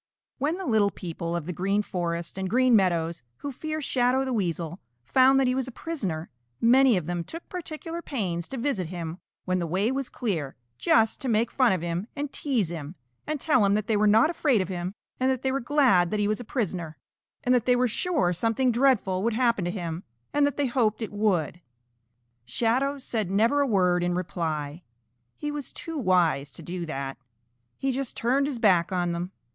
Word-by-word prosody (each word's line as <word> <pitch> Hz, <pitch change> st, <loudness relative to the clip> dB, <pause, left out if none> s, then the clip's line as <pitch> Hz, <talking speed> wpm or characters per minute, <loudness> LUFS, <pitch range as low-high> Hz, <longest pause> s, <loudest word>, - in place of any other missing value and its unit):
When 300 Hz, +6 st, 0 dB
the 380 Hz, -, -5 dB
little 215 Hz, -6 st, +3 dB
people 170 Hz, -2 st, -5 dB
of 170 Hz, -3 st, -3 dB
the 180 Hz, -, -4 dB
Green 195 Hz, +4 st, 0 dB
Forest 170 Hz, -3 st, -3 dB
and 190 Hz, -1 st, -2 dB
Green 255 Hz, +1 st, +4 dB
Meadows 170 Hz, -4 st, +1 dB, 0.2 s
who 285 Hz, -, -5 dB
fear 310 Hz, +4 st, -4 dB
Shadow 255 Hz, 0 st, +2 dB
the 260 Hz, -, -2 dB
Weasel 175 Hz, -4 st, -2 dB, 0.2 s
found 265 Hz, -, +5 dB
that 270 Hz, -, +3 dB
he 250 Hz, -, +2 dB
was 260 Hz, -1 st, -1 dB
a -, -, -6 dB
prisoner, 200 Hz, -, -4 dB, 0.3 s
many 250 Hz, -1 st, +5 dB
of 175 Hz, -, -3 dB
them 175 Hz, 0 st, -2 dB
took 330 Hz, -, -9 dB
particular 335 Hz, -1 st, -5 dB
pains 180 Hz, -, -3 dB
to 270 Hz, -, -6 dB
visit 235 Hz, -, -1 dB
him 170 Hz, 0 st, -6 dB, 0.3 s
when 185 Hz, 0 st, 0 dB
the 170 Hz, -, -2 dB
way 195 Hz, +8 st, +1 dB
was 270 Hz, -1 st, -2 dB
clear, 165 Hz, -, -3 dB, 0.2 s
just 225 Hz, -, +3 dB
to 270 Hz, -, -3 dB
make 225 Hz, +1 st, +2 dB
fun 255 Hz, -3 st, +3 dB
of 185 Hz, -3 st, -1 dB
him 175 Hz, +4 st, -2 dB
and 290 Hz, -1 st, -4 dB
tease 245 Hz, -, 0 dB
him 160 Hz, -1 st, -6 dB, 0.3 s
and 305 Hz, -1 st, -2 dB
tell 260 Hz, -7 st, +3 dB
him 200 Hz, 0 st, +3 dB
that 210 Hz, -1 st, 0 dB
they 220 Hz, -, +1 dB
were 210 Hz, +1 st, +3 dB
not 225 Hz, +10 st, +5 dB
afraid 290 Hz, -8 st, +2 dB
of 185 Hz, -1 st, -2 dB
him 180 Hz, +1 st, -4 dB, 0.2 s
and 260 Hz, +1 st, +2 dB
that 260 Hz, -2 st, -1 dB
they 265 Hz, -, +1 dB
were 270 Hz, -, 0 dB
glad 240 Hz, -, +3 dB
that 210 Hz, -, -1 dB
he 205 Hz, -, +2 dB
was 215 Hz, +2 st, 0 dB
a -, -, -5 dB
prisoner, 180 Hz, -, -3 dB, 0.5 s
and 250 Hz, -, +3 dB
that 245 Hz, -2 st, +2 dB
they 250 Hz, -, +5 dB
were 250 Hz, +1 st, +3 dB
sure 245 Hz, -, +1 dB
something 225 Hz, +7 st, +1 dB
dreadful 230 Hz, -7 st, +2 dB
would 230 Hz, +2 st, +1 dB
happen 235 Hz, -4 st, +2 dB
to -, -, -1 dB
him 175 Hz, -2 st, -4 dB, 0.3 s
and 290 Hz, 0 st, +4 dB
they 285 Hz, 0 st, -1 dB
hoped 235 Hz, -3 st, +1 dB
it 220 Hz, -, -5 dB
would. 185 Hz, -5 st, 0 dB, 0.8 s
Shadow 240 Hz, -, 0 dB
said 225 Hz, -7 st, -2 dB
never 230 Hz, +9 st, +3 dB
a 280 Hz, -, +2 dB
word 180 Hz, -5 st, +3 dB
in 175 Hz, 0 st, 0 dB
reply. 160 Hz, -4 st, -3 dB, 0.6 s
He 295 Hz, -, -3 dB
was 290 Hz, -3 st, -5 dB
too 330 Hz, -, -7 dB
wise 170 Hz, -, +2 dB
to -, -, -8 dB
do 175 Hz, -1 st, -5 dB
that. 135 Hz, -2 st, -4 dB, 0.6 s
He 270 Hz, -, 0 dB
just 265 Hz, -1 st, -4 dB
turned 270 Hz, +4 st, +2 dB
his 280 Hz, -4 st, -3 dB
back 190 Hz, -7 st, +3 dB
on 175 Hz, -2 st, 0 dB
them. 175 Hz, +2 st, -3 dB
215 Hz, 205 wpm, -26 LUFS, 175-260 Hz, 0.8 s, found